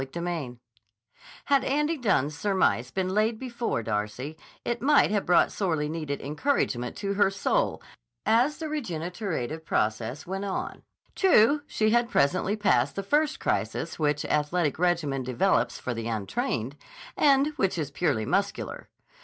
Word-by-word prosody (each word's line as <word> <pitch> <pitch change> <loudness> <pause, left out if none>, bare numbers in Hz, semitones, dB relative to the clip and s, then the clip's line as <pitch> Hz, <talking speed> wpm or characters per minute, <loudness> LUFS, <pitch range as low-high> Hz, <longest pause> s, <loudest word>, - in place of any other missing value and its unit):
CHAPTER 135 +6 -5
VI 155 -9 -4 0.9
HAD 275 -2 +3
Andy 300 +4 +1
Dunne's 155 - +1
surmise 185 - +1
been 185 +5 -2
laid 215 +3 +1
before 235 - -3
Darcy, 110 +7 -3 0.3
it 240 -1 -2
might 285 -4 +4
have 205 -2 0
brought 175 - +4
sorely 160 -7 -1
needed 155 -2 -4
encouragement 140 - -1
to 200 -1 -2
her 200 -1 +3
soul 195 0 0 0.4
as 240 +7 +3
the 320 - -4
regenerative 175 - -4
process 115 +1 -1
went 195 +2 -4
on. 195 - -4 0.3
True 295 - +4
she 215 0 +1
had 240 0 +2
presently 185 - +2
passed 210 -2 +2
the 195 - -3
first 295 +8 +1
crisis - - -2
which 150 -1 +1
athletic 150 +1 0
regimen 170 -6 +1
develops 125 0 +1
for 125 - -4
the 115 -1 -4
untrained, 110 +4 -2 0.4
and 280 0 +4
which 190 -3 +1
is 150 -3 -3
purely 145 -8 0
muscular. 200 - -2
180 Hz, 145 wpm, -27 LUFS, 140-220 Hz, 0.9 s, might